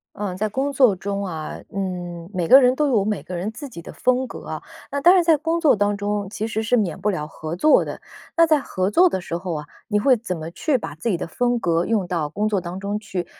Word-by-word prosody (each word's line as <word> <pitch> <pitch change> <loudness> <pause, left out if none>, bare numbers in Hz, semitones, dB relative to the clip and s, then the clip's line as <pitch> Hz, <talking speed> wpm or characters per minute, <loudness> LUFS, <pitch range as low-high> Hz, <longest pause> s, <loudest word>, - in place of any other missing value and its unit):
嗯， 200 -3 -4
在 215 +3 0
工 265 +7 -1
作 255 -7 +5
中 200 +2 -3
啊， 160 -5 -5 0.2
嗯 175 -3 -4
每 180 -2 0
个 265 +10 +9
人 250 -1 +4
都 300 0 +2
有 230 -7 +3
每 210 0 -2
个 180 - -8
人 180 +4 -2
自 265 +7 -8
己 195 -9 -9
的 170 - -10
风 255 +1 +1
格 - - -10
啊。 - - -5 0.3
那 280 - -2
当 350 +6 +7
然 360 -2 +4
在 325 -2 +4
工 325 +3 0
作 315 -4 +4
当 205 -1 +1
中， 205 0 -2
其 215 +1 -3
实 220 0 -2
是 230 +3 +2
免 190 -9 -1
不 210 - 0
了 155 -7 -1
合 155 +1 -6
作 305 +12 +5
的。 - - -6 0.4
那 335 - +6
在 310 -3 +3
合 185 -6 -2
作 360 - +5
的 190 - -3
时 170 - -4
候 175 -1 -4
啊， 150 -1 -5 0.2
你 210 -2 +2
会 255 +5 +4
怎 185 -6 -4
么 160 +1 -6
去 275 - 0
把 160 -10 -6
自 165 +9 -4
己 195 - +1
的 - - -4
风 245 +7 0
格 170 -5 +1
用 215 -5 +1
到 170 -4 -1
工 205 +8 -2
作 205 -3 +1
当 175 +1 -6
中 200 +2 -3
去， 195 -5 -4
205 Hz, 285 characters per minute, -22 LUFS, 175-250 Hz, 0.4 s, 个